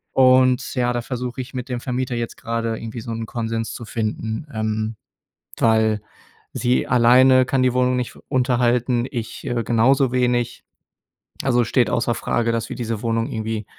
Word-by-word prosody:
Und 130 -1 +4
ja, 125 -1 +1
da 120 - -1
versuche 125 +1 -4
ich 125 +1 -10
mit 125 0 -5
dem 125 -1 -2
Vermieter 125 0 -2
jetzt 120 -1 -4
gerade 115 -1 -2
irgendwie 115 0 -6
so 115 - -6
'n 115 0 -4
Konsens 115 0 -3
zu 120 - -7
finden, 110 +3 -3
ähm, 110 0 -2 0.6
weil 110 -2 +3 0.5
sie 125 +1 +1
alleine 130 +1 +5
kann 130 0 +1
die 125 -1 +2
Wohnung 125 0 +2
nicht 125 -1 -3
f - - -16
unterhalten. 125 -2 +1
Ich, 120 +1 -6
äh, 120 -3 -1
genauso 130 +3 +3
wenig. 125 -1 0 0.8
Also, 125 -2 +3
es 115 - -1
steht 120 -2 +2
außer 120 0 0
Frage, 115 -1 0
dass 115 -1 -2
wir - - -5
diese 115 -2 -3
Wohnung 115 0 0
irgendwie 110 -2 -3
120 Hz, 175 wpm, -21 LUFS, 115-125 Hz, 0.8 s, alleine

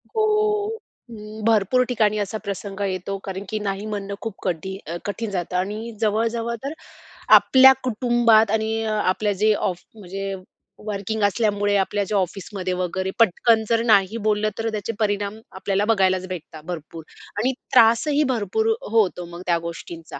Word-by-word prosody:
हो. 425 0 +1 0.3
हं, 215 -1 -9
भरपूर 225 +3 +3
ठिकाणी 215 -3 +2
असा 205 +1 -2
प्रसंग 200 0 -5
येतो 185 +2 -4
कारण 195 0 -5
की 215 - -2
नाही 200 0 -3
म्हणणं 200 -2 -4
खूप 225 -2 -4
कठी 190 +2 -3
अ, 165 - -4
कठीण 220 +2 -3
जातं. 180 -2 -3
आणि 210 +5 -3
जवळजवळ 230 +2 0
तर 280 +2 -3 0.6
आपल्या 265 0 +7
कुटुंबात 235 -3 +3
आणि 220 0 0
अ, 220 -1 -1
आपल्या 210 0 +1
जे 215 0 +5
ऑफ 180 -3 -2
म्हणजे 195 -1 -5 0.5
वर्किंग 215 +1 -3
असल्यामुळे, 205 -1 +1
आपल्या 200 +1 0
जे 205 +2 -3
ऑफिसमध्ये 190 0 -2
वगैरे 185 +1 -2
पटकन 225 +1 +4
जर 230 -1 +3
नाही 205 0 +4
बोललं 215 0 +2
तर 225 0 -1
त्याचे 215 +1 -3
परिणाम 205 0 -1 0.2
आपल्याला 195 +2 0
बघायलाच 190 -4 +2
भेटतात 160 -4 -8
भरपूर. 165 -1 -7 0.3
आणि 245 +5 +1 0.2
त्रासही 255 +5 +5
भरपूर 220 0 0
अ, - - +2 0.2
होतो 200 -5 +2
मग 170 +1 -10
त्या 170 -1 +3
गोष्टींचा. 165 -2 -9
210 Hz, 155 wpm, -22 LUFS, 190-225 Hz, 0.6 s, आपल्या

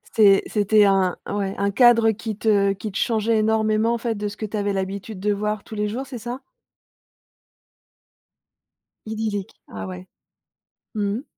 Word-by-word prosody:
C'est 200 -4 +6
c'était 210 0 +3
un 190 -2 +2
ouais, 200 -1 -2
un 200 0 0
cadre 230 0 +5
qui 220 0 -5
te 200 -3 +2
qui 200 +2 -6
te - - -5
changeait 225 -2 +1
énormément 220 +1 +2
en - - 0
fait 230 -1 -2
de 210 0 -3
ce 205 - -7
que 220 - -4
tu 215 - -6
avais 205 -1 -1
l'habitude 195 +1 -4
de 205 +2 +1
voir 210 0 -2
tous 220 - -9
les 210 0 -1
jours, 245 +6 -4
c'est 265 -2 -7
ça? 240 +3 -6 2.7
Idyllique, 215 -3 -3
ah 95 -1 -7
ouais. 90 0 -8 0.9
Mmh 205 0 -1
mh? 265 - -10
210 Hz, 170 wpm, -23 LUFS, 200-220 Hz, 2.7 s, C'est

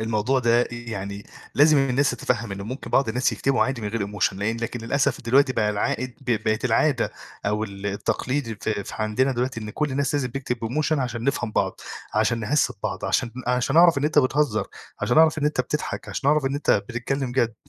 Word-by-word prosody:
الموضوع 110 +4 +1
ده 120 -1 +3
أ - - -2
يعني 105 -4 -6 0.3
لازم 150 +3 +6
الناس 135 +1 +2
تتفهَّم 115 -3 -2
إن 100 0 -5
ممكن 125 +7 -6
بعض 135 - +3
الناس 125 +2 +1
يكتبوا 135 +5 +1
عادي 135 -2 -3
من 105 - -2
غير 105 -2 -2
emotion. 100 -2 0
لإن 105 +4 -1
لكن 115 +1 -4
للأسف 140 +3 0
دلوقتي 130 +3 +3
بقى 105 -4 +1
العائد 120 +4 -2
ب 120 -5 -1
بقت 110 +2 0
العادة 125 +2 +2 0.3
أو 105 +1 0
ال 100 -1 -7
التقليدي 115 +4 -2
في 100 -1 -2
في - - -8
عندنا 110 +5 +1
دلوقتي 125 -1 -2
إن 105 0 -6
كل 150 +6 -1
الناس 140 +1 -1
لازم 135 -3 0
تكتب 130 -1 -3
بemotion 130 +7 -1
عشان 120 -3 -3
نفهم 125 -4 0
بعض، - - -1 0.3
عشان 115 -1 +2
نحِس 140 +7 +1
ببعض، - - -5
عشان - - +1
ن 130 - -6
عشان 125 +4 +1
أعرف 170 -4 +7
إن 140 - -2
أنت 150 0 +2
بتهزّر، 135 -4 +2 0.3
عشان - - +2
أعرف 160 -1 +5
إن 145 - -1
أنت 150 -3 +1
بتضحك، 150 +4 -4
عشان 140 - -1
أعرف 150 -2 +2
إن 135 - -1
أنت 145 - 0 0.2
بتتكلّم 125 +2 -2
جَد. 115 -3 +1
125 Hz, 210 wpm, -24 LUFS, 110-140 Hz, 0.3 s, أعرف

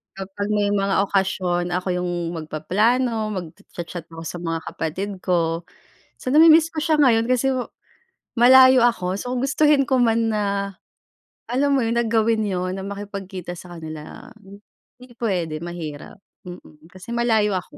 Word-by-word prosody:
Kapag 195 +1 -5
may 205 -1 +1
mga 195 -1 +1
okasyon, 180 -3 0
ako 180 +1 -2
yung 180 0 -1 0.3
mag-paplano, 215 +9 0
magcha-chat 170 -1 -8
ako 165 - -8
sa 165 +2 -6
mga 165 -1 -3
kapatid 180 +6 -4
ko. 170 -2 -1 0.5
So - - -12
na-mimiss 320 0 +7
ko 315 -2 -4
siya 315 -2 +2
ngayon 235 -4 +3
kasi 255 +1 +2 0.9
malayo 260 +1 +8
ako, 185 -5 -2
so 250 +3 -4
gustuhin 275 +2 +3
ko 260 -1 +1
man 225 -1 +2
na, 210 -1 0 1.1
alam 275 +4 +1
mo - - +2
yun 230 +1 -1
na 235 - +2
gawin 225 -1 +1
'yon, 185 -2 -2
na 190 - -6
makipagkita 195 -3 -7
sa 175 0 -11
kanila, 155 -2 -9 0.7
hindi 250 -1 -14
pwede, 175 -9 -2
mahirap, 165 -4 -7 0.3
mm, 165 -3 -13
kasi 185 +2 -14
malayo 220 -3 +2
ako. 180 -5 -7
200 Hz, 145 wpm, -22 LUFS, 175-235 Hz, 1.1 s, malayo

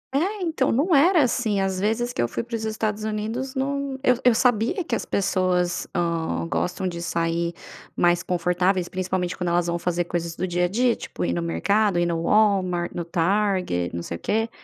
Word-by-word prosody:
Eh, 380 +6 0
então 305 -5 +1
não 295 +7 +2
era 330 +2 +5
assim, 225 -5 0
às 190 -1 -1
vezes 225 +4 0
que - - -1
eu 120 - +1
fui 115 - -3
para 235 0 -5
os 225 - -4
Estados 215 -1 -2
Unidos 220 +5 -3
não, 275 0 -2
eu 250 -3 +4 0.2
sa 240 - +2
sabia 235 - -1
que 255 - -2
as - - -4
pessoas, 185 -3 0
hã, 170 -1 -1
gostam 185 +3 -2
de 170 -1 -4
sair 170 0 -1 0.4
mais 175 0 +3
confortáveis, 180 +1 0
principalmente 185 -1 -2
quando 180 -1 -2
elas 175 0 +2
vão 170 0 -1
fazer 175 0 0
coisas 170 -1 -3
do 185 - -2
dia 180 0 +1
a - - +1
dia, 235 +6 +2
tipo - - -5
ir 85 - 0
no 85 - -1
mercado, 185 - +1
ir 175 - +2
no 170 -1 -1
Walmart, 185 -3 +2
no 175 - -3
Target, 180 - 0
não 85 - -4
sei 85 - -5
o - - -23
quê. 225 +2 0
185 Hz, 205 wpm, -24 LUFS, 175-230 Hz, 0.4 s, era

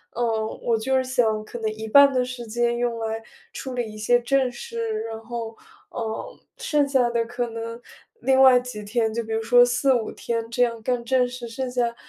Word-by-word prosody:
呃， 225 -2 0 0.2
我 235 - +2
就 265 +4 0
是 260 - +2
想， 230 -5 0
可 240 - -8
能 220 -1 -1
一 220 +1 -7
半 280 +5 +7
的 255 -1 +1
时 250 -2 -7
间 240 +1 0
用 240 -1 -1
来， 225 0 -3 0.3
处 260 - -6
理 240 -3 -3
一 - - -10
些 240 +3 +3
正 260 +1 +1
事。 460 - -4
然 225 -1 -6
后， 230 -1 -6 0.4
呃， 220 -1 -5 0.2
剩 300 - +1
下 260 -3 +3
的 235 -1 +1
可 245 +1 -3
能 230 0 -6 0.4
另 265 0 +4
外 260 -2 +8
几 245 -4 -7
天， 220 +1 0
就 235 +1 -2
比 225 - -8
如 220 0 -1
说 245 +2 +6
4-5 245 -1 +1
天 230 -1 -3
这 245 +1 +2
样 230 -2 -1
干 240 +1 -1
正 255 0 +2
事， 245 -1 -7
剩 250 +3 -4
下 240 -1 -1
240 Hz, 220 characters per minute, -24 LUFS, 225-255 Hz, 0.4 s, 外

